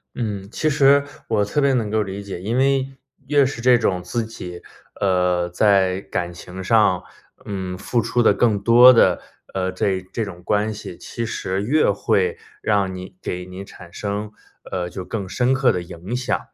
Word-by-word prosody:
嗯， 100 Hz, -5 st, -3 dB
其 155 Hz, -, 0 dB
实 140 Hz, -1 st, +5 dB, 0.2 s
我 105 Hz, -2 st, +2 dB
特 105 Hz, +8 st, -1 dB
别 140 Hz, -1 st, +3 dB
能 115 Hz, -4 st, 0 dB
够 110 Hz, 0 st, +1 dB
理 100 Hz, +1 st, -6 dB
解， 95 Hz, -3 st, -7 dB
因 110 Hz, +6 st, -3 dB
为 135 Hz, 0 st, +1 dB, 0.3 s
越 145 Hz, -1 st, +4 dB
是 120 Hz, -3 st, -4 dB
这 125 Hz, -1 st, +5 dB
种 90 Hz, -5 st, 0 dB
自 120 Hz, -2 st, -2 dB
己， 90 Hz, -6 st, -8 dB, 0.4 s
呃， 90 Hz, -2 st, +2 dB
在 95 Hz, 0 st, +2 dB
感 85 Hz, -2 st, -3 dB
情 90 Hz, +2 st, -9 dB
上， 105 Hz, -3 st, +3 dB, 0.4 s
嗯， 95 Hz, -2 st, -4 dB
付 120 Hz, +4 st, 0 dB
出 115 Hz, +1 st, +1 dB
的 110 Hz, -, +5 dB
更 105 Hz, 0 st, +2 dB
多 120 Hz, +3 st, +8 dB
的， 115 Hz, -, +4 dB, 0.4 s
呃， 95 Hz, 0 st, -1 dB
这 95 Hz, 0 st, -1 dB
这 115 Hz, -, -1 dB
种 90 Hz, -3 st, -8 dB
关 105 Hz, +2 st, +1 dB
系， 105 Hz, -4 st, -8 dB
其 115 Hz, -1 st, -5 dB
实 95 Hz, -3 st, -3 dB
越 150 Hz, +8 st, +3 dB
会 455 Hz, 0 st, 0 dB, 0.2 s
让 95 Hz, -2 st, +1 dB
你 90 Hz, 0 st, -9 dB
给 90 Hz, 0 st, -4 dB
你 95 Hz, +2 st, -8 dB
产 85 Hz, -3 st, -13 dB
生， 105 Hz, +2 st, -4 dB, 0.4 s
呃， 90 Hz, -1 st, -2 dB
就 90 Hz, +1 st, -7 dB
更 95 Hz, 0 st, -4 dB
深 125 Hz, +6 st, +1 dB
刻 130 Hz, -1 st, +3 dB
的 90 Hz, -, -2 dB
影 90 Hz, +6 st, -7 dB
响。 125 Hz, 0 st, -1 dB
100 Hz, 195 characters per minute, -21 LUFS, 95-120 Hz, 0.4 s, 多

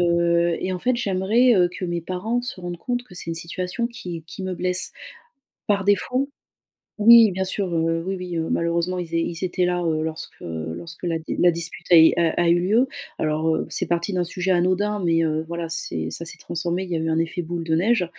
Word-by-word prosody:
heu, 170 Hz, -1 st, +2 dB
et 185 Hz, -, -2 dB
en 180 Hz, -, -3 dB
fait, 250 Hz, +3 st, +1 dB
j'aimerais, 225 Hz, +3 st, +3 dB
heu, 180 Hz, -3 st, +4 dB
que 180 Hz, -, -6 dB
mes 175 Hz, -1 st, -2 dB
parents 195 Hz, +8 st, -2 dB
se 245 Hz, -6 st, -6 dB
rendent 175 Hz, -1 st, -5 dB
compte 245 Hz, +5 st, -2 dB
que 215 Hz, -, -15 dB
c'est 180 Hz, -, -6 dB
une -, -, -2 dB
situation 180 Hz, +6 st, -3 dB
qui 180 Hz, -9 st, -7 dB
qui 190 Hz, -, -8 dB
me 185 Hz, -1 st, -3 dB
blesse 180 Hz, +1 st, +1 dB, 0.8 s
par 200 Hz, -2 st, +2 dB
défaut 250 Hz, +8 st, +1 dB, 0.7 s
oui 230 Hz, -1 st, +8 dB
bien 190 Hz, +1 st, -2 dB
sûr, 190 Hz, -1 st, -2 dB
heu, 165 Hz, 0 st, 0 dB
oui 190 Hz, +1 st, -2 dB
oui, 180 Hz, -1 st, -5 dB
heu, 165 Hz, -1 st, -2 dB
malheureusement 170 Hz, +2 st, 0 dB
ils 170 Hz, -1 st, -4 dB
é -, -, +3 dB
ils 170 Hz, +2 st, -3 dB
étaient 180 Hz, 0 st, -1 dB
là, 180 Hz, 0 st, +1 dB
heu, 160 Hz, -2 st, 0 dB
lorsque 160 Hz, 0 st, -6 dB
lorsque 85 Hz, -, -6 dB
la 165 Hz, -2 st, 0 dB
d 160 Hz, -, -5 dB
la 175 Hz, -, +6 dB
dispute 165 Hz, -1 st, -4 dB
est 160 Hz, -2 st, +8 dB
a 165 Hz, -1 st, +3 dB
a 175 Hz, -1 st, +1 dB
eu 170 Hz, +1 st, +4 dB
lieu. 220 Hz, +9 st, +3 dB, 0.3 s
Alors, 155 Hz, +1 st, +1 dB
heu, -, -, -2 dB
c'est -, -, -1 dB
parti 170 Hz, +3 st, 0 dB
d'un 180 Hz, -2 st, 0 dB
sujet 185 Hz, +2 st, -2 dB
anodin 185 Hz, +4 st, +1 dB
mais, 165 Hz, -1 st, +3 dB
heu, 155 Hz, 0 st, -1 dB
voilà, 170 Hz, 0 st, -4 dB
c'est 80 Hz, -, -3 dB
ça 170 Hz, -, -4 dB
s'est -, -, -5 dB
transformé, 170 Hz, +2 st, -3 dB
il 185 Hz, -, -8 dB
y 170 Hz, -, 0 dB
a -, -, -1 dB
eu 160 Hz, -, -2 dB
un 160 Hz, -, +1 dB
effet 165 Hz, +2 st, -1 dB
boule 170 Hz, 0 st, -4 dB
de 160 Hz, -1 st, -1 dB
neige, 185 Hz, +4 st, +2 dB
175 Hz, 230 wpm, -23 LUFS, 165-190 Hz, 0.8 s, oui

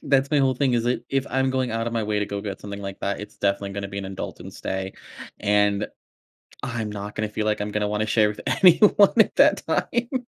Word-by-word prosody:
that's 135 Hz, 0 st, +2 dB
my 150 Hz, -, +3 dB
whole 135 Hz, -1 st, +3 dB
thing, 130 Hz, -1 st, +1 dB
is 115 Hz, -, +1 dB
that, 120 Hz, -1 st, -1 dB
if 135 Hz, 0 st, 0 dB
I'm 130 Hz, +1 st, +1 dB
going 130 Hz, -1 st, -1 dB
out 115 Hz, +1 st, -2 dB
of 115 Hz, -, -2 dB
my 115 Hz, -1 st, 0 dB
way 105 Hz, 0 st, -1 dB
to 105 Hz, -, -1 dB
go 100 Hz, 0 st, -4 dB
get 100 Hz, -2 st, -6 dB
something 100 Hz, 0 st, -7 dB
like 100 Hz, 0 st, -7 dB
that, 100 Hz, 0 st, -2 dB
it's 105 Hz, -, -10 dB
definitely 100 Hz, 0 st, 0 dB
gonna 100 Hz, 0 st, -5 dB
be 100 Hz, 0 st, -6 dB
an 100 Hz, -, -4 dB
indulgence 95 Hz, -1 st, -7 dB
day. 95 Hz, 0 st, -3 dB, 0.5 s
And 105 Hz, 0 st, +2 dB, 0.8 s
I'm 115 Hz, -3 st, -3 dB
not 105 Hz, 0 st, -6 dB
gonna 110 Hz, 0 st, -2 dB
feel 105 Hz, 0 st, -3 dB
like 105 Hz, -1 st, 0 dB
I'm 105 Hz, -, -2 dB
gonna 105 Hz, 0 st, -1 dB
wanna 105 Hz, +1 st, -1 dB
share 110 Hz, 0 st, +3 dB
with 105 Hz, -, -6 dB
anyone 195 Hz, +2 st, +6 dB
at 220 Hz, -, +5 dB
that -, -, +4 dB
time. 245 Hz, +1 st, -1 dB
105 Hz, 235 wpm, -24 LUFS, 100-130 Hz, 0.8 s, anyone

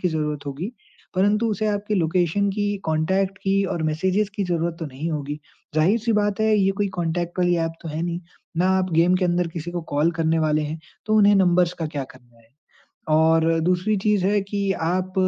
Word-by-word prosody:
की 180 Hz, -, +1 dB
ज़रूरत 150 Hz, -2 st, -3 dB
होगी, 155 Hz, -, -4 dB, 0.4 s
परंतु 205 Hz, +4 st, +2 dB
उसे 215 Hz, +1 st, -1 dB
आपके 210 Hz, 0 st, -1 dB
लोकेशन 180 Hz, +2 st, +1 dB
की, 205 Hz, 0 st, -1 dB
कॉन्टैक्ट 190 Hz, +5 st, 0 dB
की 195 Hz, 0 st, +2 dB
और 165 Hz, -, -3 dB
मैसेजेज़ 190 Hz, +7 st, 0 dB
की 200 Hz, -, -1 dB
ज़रूरत 170 Hz, -1 st, -1 dB
तो 165 Hz, -, -4 dB
नहीं 145 Hz, +5 st, -5 dB
होगी। 145 Hz, -1 st, -4 dB, 0.4 s
ज़ाहिर-सी 215 Hz, +9 st, +2 dB
बात 205 Hz, 0 st, +1 dB
है 220 Hz, 0 st, +3 dB
ये 195 Hz, -1 st, +3 dB
कोई 200 Hz, -, +2 dB
कॉन्टैक्ट 175 Hz, +1 st, -2 dB
वाली 175 Hz, -1 st, +3 dB
ऐप 165 Hz, -, -4 dB
तो 165 Hz, -, -6 dB
है 155 Hz, +2 st, -3 dB
नहीं, 175 Hz, 0 st, -2 dB, 0.4 s
ना 180 Hz, +2 st, +2 dB
आप 185 Hz, -1 st, -1 dB
गेम 170 Hz, +3 st, +4 dB
के 185 Hz, -, 0 dB
अंदर 175 Hz, 0 st, +1 dB
किसी 165 Hz, +1 st, -6 dB
को 175 Hz, 0 st, -3 dB
कॉल 150 Hz, +4 st, +3 dB
करने 165 Hz, 0 st, +2 dB
वाले 155 Hz, -1 st, +1 dB
हैं 155 Hz, +2 st, -4 dB, 0.3 s
तो 215 Hz, -, +1 dB
उन्हें 205 Hz, -1 st, +6 dB
नंबर्स 180 Hz, -2 st, +3 dB
का 160 Hz, -, -2 dB
क्या 145 Hz, -3 st, -4 dB
करना 120 Hz, -2 st, -19 dB
है 115 Hz, 0 st, -25 dB, 0.7 s
और 160 Hz, +1 st, +3 dB
दूसरी 180 Hz, +5 st, +1 dB
चीज़ 210 Hz, -3 st, +2 dB
है 205 Hz, 0 st, +2 dB
कि 200 Hz, -1 st, -1 dB, 0.2 s
आप 185 Hz, +2 st, -1 dB
175 Hz, 205 wpm, -23 LUFS, 160-200 Hz, 0.7 s, उन्हें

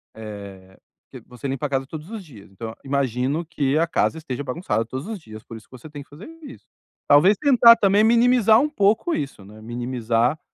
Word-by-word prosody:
eh, 100 Hz, -3 st, -11 dB, 0.3 s
que -, -, -10 dB
você 125 Hz, +3 st, -8 dB
limpa 135 Hz, +2 st, -3 dB
a -, -, -15 dB
casa 135 Hz, -1 st, -1 dB
todos 155 Hz, +4 st, -9 dB
os 215 Hz, -4 st, -7 dB
dias, 110 Hz, -10 st, -16 dB
então, 110 Hz, +3 st, -8 dB
imagino 135 Hz, +3 st, -1 dB
que 150 Hz, -3 st, -1 dB
a 165 Hz, -, +1 dB
casa 165 Hz, -, 0 dB
esteja 145 Hz, -4 st, -6 dB
bagunçada 125 Hz, -, -2 dB
todos 130 Hz, -, -7 dB
os 220 Hz, -4 st, -6 dB
dias, 110 Hz, -5 st, -12 dB
por 115 Hz, -, -10 dB
isso 110 Hz, -, -17 dB
que -, -, -54 dB
você 155 Hz, +6 st, -13 dB
tem 145 Hz, -1 st, -9 dB
que -, -, -32 dB
fazer 150 Hz, -, -12 dB, 0.2 s
isso. 275 Hz, -1 st, -12 dB, 0.4 s
Talvez 155 Hz, +9 st, +5 dB
tentar 245 Hz, -5 st, +6 dB
também 205 Hz, -1 st, +3 dB
minimizar 235 Hz, -1 st, +4 dB
um 300 Hz, -, 0 dB
pouco 220 Hz, -, +1 dB
isso, 135 Hz, -8 st, -6 dB
né. 105 Hz, +2 st, -14 dB
Minimizar 120 Hz, +3 st, -1 dB
140 Hz, 205 wpm, -22 LUFS, -, 0.4 s, tentar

